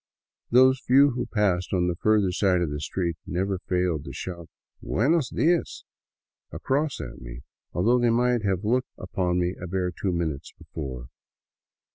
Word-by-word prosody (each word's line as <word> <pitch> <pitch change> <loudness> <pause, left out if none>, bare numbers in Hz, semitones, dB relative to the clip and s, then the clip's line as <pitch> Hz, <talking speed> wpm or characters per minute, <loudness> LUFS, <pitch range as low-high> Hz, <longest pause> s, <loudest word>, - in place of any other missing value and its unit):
Those 130 +2 +5
few 140 +3 +5
who 125 0 -3
passed 95 -5 0
on 90 -2 +2
the 90 - -1
further 105 0 +2
side 90 -1 +2
of 80 - -2
the 75 - -3
street 85 +2 -2
never 95 +1 -1
failed 90 -5 -1
to - - -7
shout 85 -3 -7 0.2
" - - -48
Buenos 140 - +1
dias 165 +7 0 0.4
" - - -60
across 140 0 -1
at 65 - -8
me, - - -9 0.3
though 115 +8 +2
they 120 -1 +3
might 120 0 +2
have 95 -1 0
looked 125 +4 +1
in - - -12
upon 90 -1 -1
me 90 0 0
a 90 - -5
bare 90 0 -1
two 95 +2 -2
minutes 80 -4 -3
before. 65 -5 -7
95 Hz, 175 wpm, -25 LUFS, 85-120 Hz, 0.4 s, Those